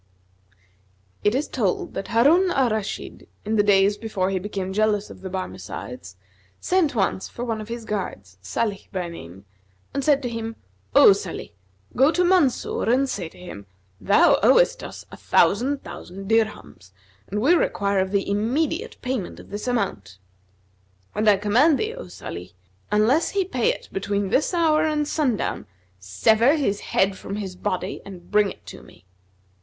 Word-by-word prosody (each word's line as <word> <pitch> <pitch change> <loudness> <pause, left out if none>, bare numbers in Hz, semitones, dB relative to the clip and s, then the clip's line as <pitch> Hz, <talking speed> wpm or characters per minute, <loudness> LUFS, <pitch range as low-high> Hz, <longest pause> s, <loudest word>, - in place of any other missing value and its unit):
It 210 +3 +2
is 285 +3 0
told 205 -8 -1
that 195 0 -5
Harun 305 +11 +4
al 265 -8 +2
Rashid, 215 -2 -4 0.2
in 220 +1 0
the 210 - +5
days 200 0 +4
before 195 -4 -2
he 190 - 0
became 190 -1 -4
jealous 210 0 +1
of - - -13
the 190 - -6
Barmecides, 95 - -7 0.4
sent 350 -7 +1
once 195 -2 0
for 240 - -6
one 225 -2 -2
of 215 - -8
his 230 0 -6
guards, 100 - -5
Salih 200 - -3
by 180 -3 -3
name, 95 - -11 0.5
and 275 - -2
said 285 -1 +3
to - - -1
him, 225 -1 -5 0.4
"O - - +9
Sбlih, 195 -3 -3 0.4
go 270 +4 +5
to 360 - +1
Mansъr[FN#246] 345 -10 +2
and 270 +2 +3
say 180 -10 -4
to - - -19
him: 100 - -10 0.3
'Thou 305 - +4
owest - - +4
us - - -9
a - - -10
thousand 265 +7 +2
thousand 180 +2 -9
dirhams 220 - -1 0.4
and 210 - -3
we 275 +11 +4
require 200 - +1
of 190 0 0
thee 200 0 0
immediate 230 +10 -1
payment 250 -7 -3
of - - -14
this 205 +4 -5
amount.' 195 - -2 1.0
And 215 0 +2
I 205 - +5
command 245 +10 +3
thee, 435 +1 -2
O - - -9
Salih, 90 +3 -8 0.4
unless 225 +10 +3
he 395 -2 0
pay 255 -10 +1
it - - -8
between 200 0 -2
this 270 - +1
hour 325 -3 +3
and 300 -1 0
sundown, 275 -9 -1 0.3
sever 220 - +3
his 205 -10 0
head 190 0 0
from 200 - -6
his 195 -3 -5
body 185 +1 -3
and 180 -3 -12
bring 210 -1 +4
it - - -12
to - - -10
me." - - -18
210 Hz, 170 wpm, -23 LUFS, 190-265 Hz, 1.0 s, O